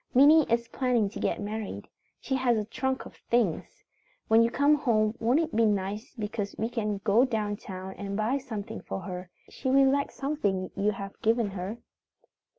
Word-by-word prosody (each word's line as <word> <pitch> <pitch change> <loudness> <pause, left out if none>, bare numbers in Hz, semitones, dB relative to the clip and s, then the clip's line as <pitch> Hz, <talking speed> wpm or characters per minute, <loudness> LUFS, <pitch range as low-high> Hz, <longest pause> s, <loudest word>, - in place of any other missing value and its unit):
"Minnie 290 +1 +6
is 235 0 +2
planning 240 -4 +1
to - - -7
get - - -1
married. 205 - -5 0.3
She 270 - -4
has 255 -3 +2
a 210 - -1
trunk 265 +4 -2
of - - -12
things. 230 -9 0 0.5
When 225 +1 +6
you 230 - +4
come 285 +5 +3
home 225 -7 +2
won't 240 +6 +3
it 325 -5 -2
be 230 - +4
nice 205 +5 -2
because 210 -2 -4
we 225 +2 -1
can 215 -4 -2
go 220 +4 +4
down 215 -5 -1
town 190 -1 -7
and 200 0 -4
buy 230 +6 +1
something 220 -7 -6
for 195 - -5
her. 180 -2 -6 0.2
She 260 - -3
will 270 0 +5
like 280 0 +1
something 205 -11 -2
you 200 +1 +1
have 195 0 -8
given 225 -2 +2
her. 190 +4 -5
225 Hz, 185 wpm, -28 LUFS, 205-260 Hz, 0.5 s, Minnie